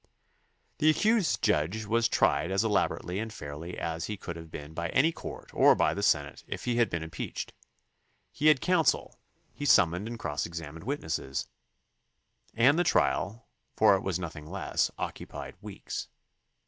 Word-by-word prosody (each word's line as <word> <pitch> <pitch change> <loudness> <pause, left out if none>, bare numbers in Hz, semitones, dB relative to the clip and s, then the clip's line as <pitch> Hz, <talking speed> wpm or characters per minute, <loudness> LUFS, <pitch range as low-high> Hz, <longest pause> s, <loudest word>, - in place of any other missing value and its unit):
The 155 - +5
accused 210 +4 +2
judge 90 +9 +1
was 115 +2 +2
tried 90 - +2
as 95 +3 +1
elaborately 100 -3 0
and 110 0 -4
fairly 75 -1 -7
as 80 0 -3
he 105 - -4
could 85 -3 -6
have 80 -1 -9
been 75 0 -8
by 85 +1 -3
any 155 +5 +3
court - - -9
or - - +6
by - - +2
the - - -3
Senate - - +1
if - - -5
he 120 -1 0
had 120 -1 +3
been 85 -1 -3
impeached. 80 0 -5 0.8
He 150 - +1
had 150 -4 +6
counsel, 175 -5 +1 0.3
he - - -7
sum 100 - +6
moned 90 +5 -4
and 115 0 -5
cross 75 -8 -2
examined 80 -1 -8
witnesses, 80 - -3 1.1
and 130 +8 +5
the - - +4
trial, 115 -8 +1 0.3
for - - +6
it 95 - -1
was 95 -3 -1
nothing 80 -4 -7
less, 95 +3 0
occupied - - -6
weeks. - - -6
95 Hz, 165 wpm, -29 LUFS, 80-120 Hz, 1.1 s, or